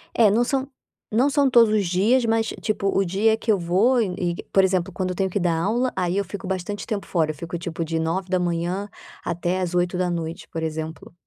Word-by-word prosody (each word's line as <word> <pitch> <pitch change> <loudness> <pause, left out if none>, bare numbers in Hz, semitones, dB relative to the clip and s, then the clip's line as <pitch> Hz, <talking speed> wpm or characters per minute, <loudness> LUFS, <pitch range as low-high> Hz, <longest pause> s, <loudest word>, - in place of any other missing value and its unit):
É, 225 -3 +6
não 225 +4 +3
são 265 +2 -1 0.4
não 245 +6 +3
são 285 -1 +3
todos 235 -4 +5
os 210 -2 +2
dias, 215 +8 +3
mas 225 0 +1
tipo, 210 -2 -1
o 195 - +3
dia 210 +5 +2
que 225 - 0
eu 205 - +3
vou 200 +9 +3
e 190 -5 -1
e 175 -1 -1 0.2
por 195 - +5
exemplo, 185 0 +1
quando 185 +1 -2
eu - - -4
tenho 190 +1 0
que 195 - -1
dar 175 -2 +1
aula, 235 +8 0
aí 180 0 0
eu 200 - 0
fico 190 +1 -7
bastante 190 +2 -4
tempo 210 -4 -3
fora, 160 -4 0
eu 155 - -10
fico, 170 +3 -6
tipo, 170 -1 -4
de 165 0 -2
9h 180 +2 -1 0.3
até 175 +2 -1
às 180 -1 -2
20h, 175 -2 -1
por 165 0 -4
exemplo. 160 +1 -5
185 Hz, 220 wpm, -23 LUFS, 175-215 Hz, 0.4 s, É